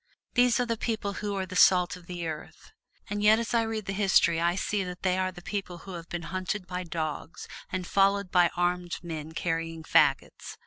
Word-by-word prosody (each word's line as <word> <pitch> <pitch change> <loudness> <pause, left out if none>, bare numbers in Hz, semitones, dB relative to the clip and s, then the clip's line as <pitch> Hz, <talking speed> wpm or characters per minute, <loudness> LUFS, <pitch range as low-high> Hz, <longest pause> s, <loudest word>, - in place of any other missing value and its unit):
These 245 -1 +4
are 245 - +2
the 230 -1 -2
people 215 -3 -2
who 205 -1 -2
are 190 -1 -2
the 185 0 -9
salt 180 -1 +5
of 180 -2 -14
the 175 -1 -5
earth. 155 - -7 0.4
And 205 0 -3
yet 210 +1 +6
as 230 0 -3
I 235 - +4
read 220 -2 -3
history 190 -4 +3
I 170 +1 +2
see 200 +1 -1
that 180 0 -7
they 185 -1 +2
are 185 0 0
the 175 -1 -12
people 195 -3 -4
who 190 - -7
have 170 -1 -8
been 175 -1 -4
hunted 185 +1 -2
by 180 0 -4
dogs, 160 -1 -5 0.2
and 185 -1 -2
followed 200 0 +2
by 175 -2 +5
armed 175 0 0
men 160 -2 -6
carrying 165 -1 -2
fagots. - - +2
185 Hz, 210 wpm, -28 LUFS, 175-200 Hz, 0.4 s, yet